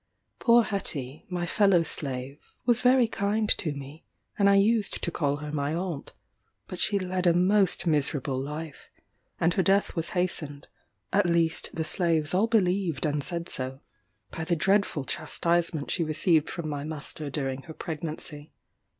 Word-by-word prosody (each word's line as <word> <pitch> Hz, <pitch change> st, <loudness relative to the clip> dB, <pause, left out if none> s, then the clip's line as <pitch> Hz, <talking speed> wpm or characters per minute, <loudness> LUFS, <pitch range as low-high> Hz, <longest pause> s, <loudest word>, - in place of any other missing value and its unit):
Poor 235 Hz, 0 st, +5 dB
Hetty, 150 Hz, -, -2 dB
my 175 Hz, -1 st, -2 dB
fellow 195 Hz, -2 st, +3 dB
slave, 140 Hz, -2 st, -3 dB, 0.3 s
was 240 Hz, 0 st, +4 dB
very 250 Hz, -1 st, +5 dB
kind 210 Hz, 0 st, -1 dB
to 160 Hz, -, -1 dB
me, 140 Hz, +2 st, -9 dB, 0.3 s
and 200 Hz, -1 st, +4 dB
I 200 Hz, -, +5 dB
used 210 Hz, +1 st, +2 dB
to 170 Hz, -, -1 dB
call 145 Hz, -4 st, 0 dB
her 150 Hz, 0 st, -6 dB
my 145 Hz, +1 st, -1 dB
Aunt; 175 Hz, -4 st, -4 dB, 0.5 s
but 185 Hz, -, -7 dB
she 200 Hz, +2 st, +2 dB
led 185 Hz, -1 st, -1 dB
a 170 Hz, -, +4 dB
most 190 Hz, +1 st, +2 dB
miserable 145 Hz, -4 st, +1 dB
life, 150 Hz, +3 st, -7 dB, 0.5 s
and 170 Hz, +1 st, +2 dB
her 190 Hz, -, +2 dB
death 195 Hz, +2 st, +2 dB
was 165 Hz, -1 st, 0 dB
hastened 150 Hz, -5 st, -2 dB, 0.5 s
(at 200 Hz, -2 st, +3 dB
least 170 Hz, -1 st, +1 dB
the 160 Hz, -, -1 dB
slaves 160 Hz, -2 st, 0 dB
all 200 Hz, +5 st, +3 dB
believed 185 Hz, -, +1 dB
and 145 Hz, -1 st, 0 dB
said 170 Hz, 0 st, -1 dB
so,) 130 Hz, +1 st, -2 dB, 0.5 s
by 165 Hz, -, -5 dB
the 170 Hz, +2 st, 0 dB
dreadful 195 Hz, -4 st, +1 dB
chastisement 170 Hz, +1 st, 0 dB
she 170 Hz, -, +1 dB
received 155 Hz, 0 st, +2 dB
from 170 Hz, -3 st, -5 dB
my 145 Hz, -2 st, -4 dB
master 150 Hz, -1 st, -4 dB
during 135 Hz, -2 st, -3 dB
her 160 Hz, -, -9 dB
pregnancy. 155 Hz, -2 st, -6 dB
165 Hz, 160 wpm, -27 LUFS, 150-190 Hz, 0.5 s, Poor